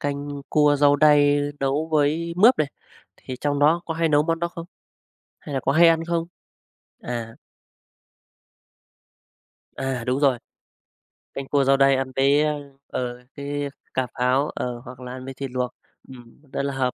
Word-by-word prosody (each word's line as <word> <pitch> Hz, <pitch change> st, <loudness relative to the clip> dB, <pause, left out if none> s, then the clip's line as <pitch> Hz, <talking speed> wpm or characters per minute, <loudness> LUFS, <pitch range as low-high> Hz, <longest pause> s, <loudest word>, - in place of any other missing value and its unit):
canh 145 Hz, 0 st, -4 dB
cua 150 Hz, -1 st, +4 dB
rau 145 Hz, 0 st, +4 dB
đay 145 Hz, -1 st, +5 dB, 0.2 s
nấu 140 Hz, +3 st, 0 dB
với 155 Hz, +3 st, +1 dB
mướp 230 Hz, +7 st, +6 dB
này, 150 Hz, -, +1 dB, 0.5 s
thì 130 Hz, -, -8 dB
trong 145 Hz, -1 st, 0 dB
đó 155 Hz, +4 st, +4 dB
có 160 Hz, -, -3 dB
hay 165 Hz, 0 st, +1 dB
nấu 150 Hz, -1 st, +4 dB
món 165 Hz, +1 st, -1 dB
đó 170 Hz, +1 st, -1 dB
không? 170 Hz, -1 st, -9 dB, 0.7 s
Hay 145 Hz, -, -7 dB
là 135 Hz, -, 0 dB
có 135 Hz, -, 0 dB
hay 170 Hz, +3 st, +6 dB
ăn 165 Hz, 0 st, +2 dB
không? 170 Hz, 0 st, -1 dB, 0.7 s
À. 115 Hz, -2 st, -5 dB, 2.4 s
À, 135 Hz, -2 st, -3 dB
đúng 130 Hz, +2 st, 0 dB
rồi. 135 Hz, -4 st, +3 dB, 1.0 s
Canh 135 Hz, -1 st, -6 dB
cua 140 Hz, 0 st, +2 dB
rau 135 Hz, +1 st, +4 dB
đay 135 Hz, 0 st, +5 dB
ăn 130 Hz, 0 st, -2 dB
với, 140 Hz, +2 st, +4 dB
ơ, 150 Hz, -1 st, -1 dB, 0.3 s
ờ, 125 Hz, -1 st, -4 dB
cái 145 Hz, 0 st, -3 dB, 0.3 s
cà 130 Hz, -1 st, 0 dB
pháo, 130 Hz, +4 st, +2 dB
ờ, 120 Hz, -1 st, -4 dB
hoặc 125 Hz, +1 st, -10 dB
là 125 Hz, -1 st, -8 dB
ăn 130 Hz, 0 st, -8 dB
với 135 Hz, -, -6 dB
thịt 135 Hz, 0 st, -6 dB
luộc, 125 Hz, -1 st, -2 dB, 0.4 s
ừm, 120 Hz, -1 st, -14 dB
rất -, -, -1 dB
là 140 Hz, 0 st, -2 dB
hợp, 130 Hz, -1 st, -1 dB
140 Hz, 175 wpm, -23 LUFS, 130-150 Hz, 2.4 s, mướp